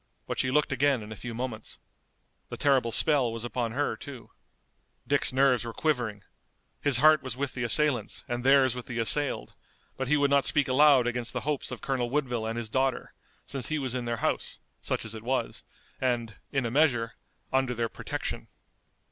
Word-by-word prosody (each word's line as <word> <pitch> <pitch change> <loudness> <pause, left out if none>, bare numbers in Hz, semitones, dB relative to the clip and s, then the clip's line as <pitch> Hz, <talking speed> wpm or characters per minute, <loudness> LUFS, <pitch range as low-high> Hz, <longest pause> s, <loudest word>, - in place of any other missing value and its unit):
But - - -4
she 130 - +2
looked 150 +2 +2
again 135 -3 +2
in 105 - -10
a - - -6
few 120 +2 -7
moments. 120 -3 -4 0.7
The - - -6
terrible 130 -5 +2
spell 135 0 +3
was 115 +1 -4
upon 120 -2 -2
her, 145 +3 0
too. 135 -4 -10 0.8
Dick's - - +2
nerves 130 -2 +3
were 115 -1 -7
quivering. 120 -10 -1 0.6
His 140 -4 +4
heart 155 +3 +6
was 130 -2 -6
with 140 0 -2
the 125 - -3
assailants 120 -2 +1
and 120 0 -3
theirs 135 -2 +5
with 125 -1 -7
the 120 - -5
assailed, 140 +5 +2 0.4
but 130 - -2
he 150 +3 +3
would 140 -1 +2
not 140 -1 +4
speak 145 -2 +2
aloud 135 -1 +5
against 120 -1 -2
the - - -2
hopes 150 -1 -2
of - - -7
Colonel 130 -3 -1
Woodville 125 -5 -1
and 115 +1 -3
his 120 -1 -3
daughter, 130 +3 -1 0.3
since 135 -4 -1
he 155 - -1
was 130 -4 -2
in 125 -1 -3
their 120 0 -2
house, - - -2 0.2
such - - -2
as 110 - -5
it 110 - -7
was, 130 +3 -2 0.4
and, 120 -4 -1 0.2
in 135 -3 0
a 115 - -2
measure, 120 -5 +2 0.4
under 130 -2 +1
their 115 0 0
protection. - - -5
130 Hz, 195 wpm, -28 LUFS, 120-140 Hz, 0.8 s, heart